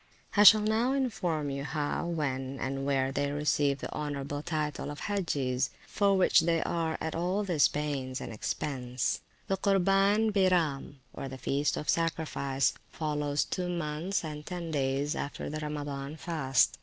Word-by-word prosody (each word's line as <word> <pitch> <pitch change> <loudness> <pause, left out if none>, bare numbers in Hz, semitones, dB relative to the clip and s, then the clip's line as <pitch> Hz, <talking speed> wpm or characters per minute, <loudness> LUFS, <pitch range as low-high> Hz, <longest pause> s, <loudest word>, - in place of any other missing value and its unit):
I 205 - +5
shall 215 +1 +10
now 220 +5 +2
inform 175 - -1
you 140 0 -3
how, 150 +3 -2
when, 135 -5 -2
and 135 +1 -2
where, 135 -1 +1
they 140 +1 -1
receive 145 -1 +1
the - - -5
honourable 145 -1 -3
title 150 -2 -2
of 145 0 -7
Hagges, 140 -10 0 0.2
for 200 -1 +2
which 185 - +5
they 165 0 +2
are 165 -2 -1
at 160 - -3
all 180 +5 0
this 175 -7 +4
pains 140 -4 -3
and - - -6
expence. 125 +2 -2 0.3
The 195 - 0
Curbaen 195 +2 +3
Byram, 165 -8 +1
or 135 - -5
the 130 - -7
Feast 140 +2 0
of 150 - -5
Sacrifice, 155 -5 0 0.2
follows 150 -2 -1
two 180 -1 -3
months 170 +2 -2
and 150 -1 -6
ten 170 -1 -5
days 140 +1 0
after 145 - -4
the 155 - -3
Ramadan 145 -1 -4
fast. 150 -7 +1
150 Hz, 155 wpm, -30 LUFS, 140-175 Hz, 0.3 s, shall